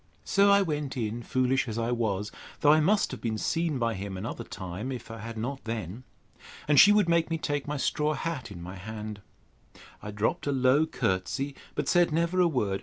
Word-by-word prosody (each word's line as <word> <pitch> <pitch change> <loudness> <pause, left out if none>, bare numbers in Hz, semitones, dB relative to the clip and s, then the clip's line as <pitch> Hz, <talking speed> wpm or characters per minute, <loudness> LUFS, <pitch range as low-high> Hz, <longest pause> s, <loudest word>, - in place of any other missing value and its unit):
So 200 0 +4
I 200 0 +6
went 150 -6 -3
in, 115 0 -2
foolish 130 +2 +1
as 110 -1 -4
I 115 +1 -1
was; 105 -4 -1 0.3
though 145 - +6
I 155 - +6
must 200 +7 +2
have - - -7
been 110 -2 -2
seen 165 +5 0
by 115 -2 0
him 95 -1 -5
another 110 +4 -5
time, 95 +5 -6
if 125 -3 -7
I 115 - -7
had 115 +1 -7
not 130 +5 -4
then. 110 +1 -5 0.6
And 145 -2 +5
she 205 - +9
would 205 -3 +4
make 170 -1 +2
me 165 - 0
take 145 -2 -2
my 150 0 -2
straw 150 +2 0
hat 145 -8 -4
in 90 -4 -9
my 90 +2 -8
hand. 105 +1 -7 0.8
I 105 - -7
dropt 105 +6 -1
a - - +2
low 135 +3 +3
courtesy, 135 +5 -1 0.2
but 150 -2 -2
said 175 -1 +4
never 170 +3 +1
a 175 - +5
word. 105 -11 0
130 Hz, 210 wpm, -28 LUFS, 110-155 Hz, 0.8 s, she